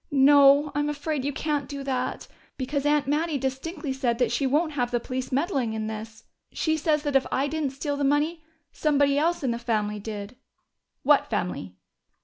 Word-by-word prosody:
"No, 285 0 +6
I'm 290 0 0
afraid 295 -1 -2
you 285 - -1
can't 290 -1 -2
do 280 -1 -5
that. 260 -2 -3 0.3
Because 280 +2 -1
Aunt 295 -1 +3
Mattie 300 +2 0
distinctly 270 +3 -3
said 250 -3 0
that 245 -1 +1
she 265 +3 +1
won't 310 +4 +1
have 250 -5 -1
the 240 0 0
police 255 +2 -5
meddling 265 -4 0
in 220 -1 -3
this. 220 +1 -7 0.3
She 315 -1 0
says 305 -1 +1
that 290 -2 -2
if 270 - +3
I 270 - +1
didn't 305 -1 -1
steal 285 +1 -3
the 285 - -1
money 300 +4 +1 0.3
somebody 285 -2 +2
else 340 +1 0
in 255 - +1
the 235 - -3
family 210 -3 -1
did." 205 +2 -7 0.7
"What 290 +1 +4
family?" 180 - -3
280 Hz, 185 wpm, -26 LUFS, 245-295 Hz, 0.7 s, No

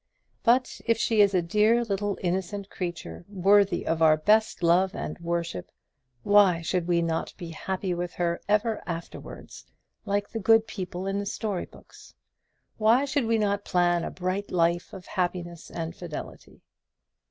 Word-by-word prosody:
But 250 +2 +2
if 230 -1 +3
she 225 -1 +3
is 200 -1 +4
a 180 - +2
dear 215 +7 +3
little 205 -2 -2
innocent 190 +2 -2
creature, 175 -1 -5
worthy 200 -1 +3
of 165 0 -1
our 155 -1 +6
best 210 +4 +2
love 180 +3 +3
and - - -5
worship, 170 - -3 0.5
why 200 -5 +5
should 175 +1 -1
we 170 -1 +2
not 165 -1 -2
be 175 -3 -7
happy 185 +3 -3
with 175 0 -4
her 170 -1 -1
ever 215 +1 +1
afterwards, 170 -1 -8 0.4
like 205 -1 -1
the 225 - -4
good 225 +2 +4
people 185 -3 -6
in 195 +1 -1
the 200 - -4
story 205 -3 -3
books? - - -17 0.6
why 225 +5 +4
should 280 -2 0
we 230 0 +2
not 205 -1 0
plan 175 -1 +2
a - - -3
bright 185 +2 -3
life 170 0 +1
of 185 -2 -10
happiness 175 -3 -3
and 165 0 -5
fidelity? 170 -4 -9
185 Hz, 160 wpm, -27 LUFS, 175-205 Hz, 0.6 s, our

